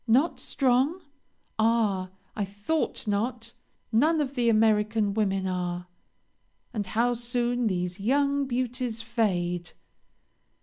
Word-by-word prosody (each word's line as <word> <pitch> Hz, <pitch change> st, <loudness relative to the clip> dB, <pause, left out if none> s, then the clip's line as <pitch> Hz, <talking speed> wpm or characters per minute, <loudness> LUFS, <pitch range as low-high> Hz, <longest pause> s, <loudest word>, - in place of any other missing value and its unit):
Not 265 Hz, +9 st, +3 dB
strong? 270 Hz, +6 st, +1 dB, 0.6 s
Ah! 215 Hz, -5 st, +2 dB, 0.3 s
I 210 Hz, -, -1 dB
thought 205 Hz, +11 st, -2 dB
not, 230 Hz, +3 st, -2 dB, 0.4 s
none 305 Hz, +8 st, +3 dB
of 280 Hz, -2 st, -1 dB
the 240 Hz, -3 st, +2 dB
American 215 Hz, -1 st, +3 dB
women 195 Hz, -3 st, 0 dB
are, 180 Hz, -1 st, -2 dB, 0.9 s
and 205 Hz, -3 st, -2 dB
how 235 Hz, +5 st, +2 dB
soon 240 Hz, 0 st, 0 dB
these 180 Hz, -1 st, -2 dB
young 280 Hz, +5 st, +2 dB
beauties 245 Hz, -2 st, -2 dB
fade!" 180 Hz, -7 st, -1 dB
225 Hz, 105 wpm, -27 LUFS, 200-245 Hz, 0.9 s, Not